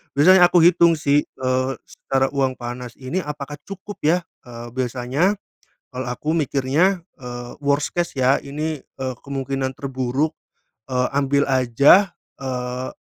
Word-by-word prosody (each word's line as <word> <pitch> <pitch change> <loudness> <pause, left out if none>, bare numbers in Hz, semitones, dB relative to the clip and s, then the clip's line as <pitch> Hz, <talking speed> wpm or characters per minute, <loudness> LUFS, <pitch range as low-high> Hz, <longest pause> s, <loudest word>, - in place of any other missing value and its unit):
Biasanya 175 +5 +7
aku 175 -1 +4
hitung, 170 -1 +6
sih, 145 -1 +2
eee, 130 0 -1
secara 135 0 -1
uang 135 -2 0
panas 120 -1 -7
ini, 130 +7 -3
apakah 145 -2 -6
cukup, 200 +1 -8
ya, 170 +4 +2 0.2
eee, 120 -1 -8
biasanya 130 - 0 0.6
kalau 130 -1 -5
aku 125 +5 -3
mikirnya, 155 +6 +1 0.2
eee, 120 -1 -7
worst 140 +1 +1
case, 175 -1 -1
ya, 130 +1 +4
ini, 150 +2 -3
eee, 130 -1 -6
kemungkinan 135 -1 -2
terburuk, 135 +2 -1 0.6
eee, 125 0 +1
ambil 140 0 +2
aja, 135 - +5 0.3
eee, 125 -1 -3
135 Hz, 135 wpm, -22 LUFS, 130-155 Hz, 0.6 s, Biasanya